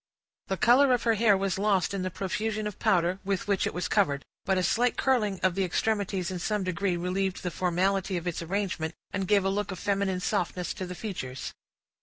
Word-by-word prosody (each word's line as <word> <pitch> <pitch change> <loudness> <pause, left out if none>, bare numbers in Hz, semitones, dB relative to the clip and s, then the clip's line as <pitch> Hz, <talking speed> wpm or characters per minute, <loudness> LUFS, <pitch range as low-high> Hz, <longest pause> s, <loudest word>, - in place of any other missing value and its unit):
The 190 - -1
color 255 +4 +5
of 240 - -4
her 230 - +3
hair 215 -2 +4
was 195 -1 -1
lost 200 -3 +2
in 195 - -2
the 185 - -1
profusion 210 +4 -2
of 210 -2 -5
powder 180 +1 +2
with 195 0 -2
which 200 -2 +1
it - - -4
was 180 - -1
covered; 140 -1 +1 0.2
but 190 -1 +2
a 185 - +1
slight 245 +6 +2
curling 215 -8 +1
of 185 -1 +3
the 195 +2 0
extremities 195 -1 -1
in 180 - -4
some 210 +2 -1
degree 185 0 -1
relieved 185 +2 -1
the 180 - -2
formality 185 +2 0
of 170 - -5
its 175 -2 -2
arrangement, 175 -2 -2 0.2
and 195 -2 -1
gave 200 -1 +3
a - - +3
look 205 +1 -1
of 190 - -4
feminine 195 -1 0
softness 180 -2 -1
to 185 - -5
the 180 - -6
features. 150 - -5
190 Hz, 215 wpm, -28 LUFS, 180-205 Hz, 0.2 s, color